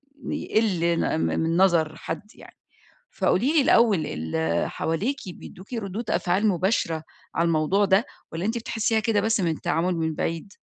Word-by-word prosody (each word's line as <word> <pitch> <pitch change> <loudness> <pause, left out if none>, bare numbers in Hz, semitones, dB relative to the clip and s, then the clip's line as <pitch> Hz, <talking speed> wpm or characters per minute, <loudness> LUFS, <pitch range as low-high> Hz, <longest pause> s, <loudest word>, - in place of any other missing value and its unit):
بيقل 215 -9 -1 0.2
ن - - 0
م 80 - +1
من 165 - 0
نظر 165 -4 +3
حد 185 +6 -6
يعني. - - -15 0.6
فقولي 260 - +2
لي 310 - +5
الأوّل 225 -9 +4
ال 80 +2 -1
حواليكِ 210 - -1
بيدُّوكِ 185 +5 -11
ردود 215 0 -4
أفعال 190 +5 +1
مباشرة 180 -4 0 0.3
على 170 - +2
الموضوع 170 +5 +2
ده، 195 +3 +3 0.3
والّا 165 +4 -3
أنتِ 225 +2 0
بتحسيها 225 -1 0
كده 215 -2 +1
بس 220 0 +1
من 170 -3 +1
التعامل 170 +3 -1
من 160 -1 -1
بعيد؟ 165 +4 -3
185 Hz, 160 wpm, -25 LUFS, 165-220 Hz, 0.6 s, لي